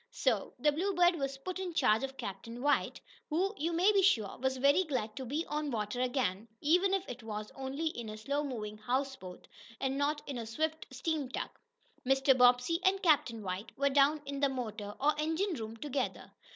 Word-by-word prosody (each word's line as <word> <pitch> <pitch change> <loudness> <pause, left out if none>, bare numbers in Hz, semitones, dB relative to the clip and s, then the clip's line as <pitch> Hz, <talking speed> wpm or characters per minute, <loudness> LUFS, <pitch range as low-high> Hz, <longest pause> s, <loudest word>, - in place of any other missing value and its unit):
So - - 0
the 300 - +3
Bluebird 355 +2 +3
was 275 -2 -2
put 370 +7 -5
in 360 -3 -4
charge 250 -6 +3
of 270 0 -5
Captain 230 +6 -6
White, 290 0 +1 0.3
who, 370 +6 +1
you 330 +1 -1
may 355 +5 +4
be 400 -2 +4
sure, 225 - +3
was 265 +1 0
very 285 +7 +4
glad 245 -9 -3
to 265 -1 -5
be 305 +7 -1
on 300 0 -2
the 240 - -2
water 210 +4 -2
again, 240 -5 0
even 355 +6 +3
if 390 -1 0
it 245 0 -7
was 215 -1 -6
only 270 +4 -4
in 240 -8 -3
a 215 - -6
slow 280 +7 -1
moving 215 -6 -5
houseboat, 245 -5 -3 0.3
and 270 0 -1
not 295 +1 0
in 270 -4 -4
a 225 - -5
swift 315 +7 -2
steam 275 +1 -2
tug. - - -3 0.5
Mr. 270 +1 +4
Bobbsey 250 +6 +4
and 390 +1 +2
Captain 250 - +3
White 185 +3 -5
were 280 +1 +2
down 290 +2 +4
in 280 0 -4
the 280 0 +3
motor, 215 -5 -5
or 295 +2 +3
engine 325 +6 0
room 225 -5 -6
together. 275 0 -3
270 Hz, 200 wpm, -32 LUFS, 235-315 Hz, 0.5 s, may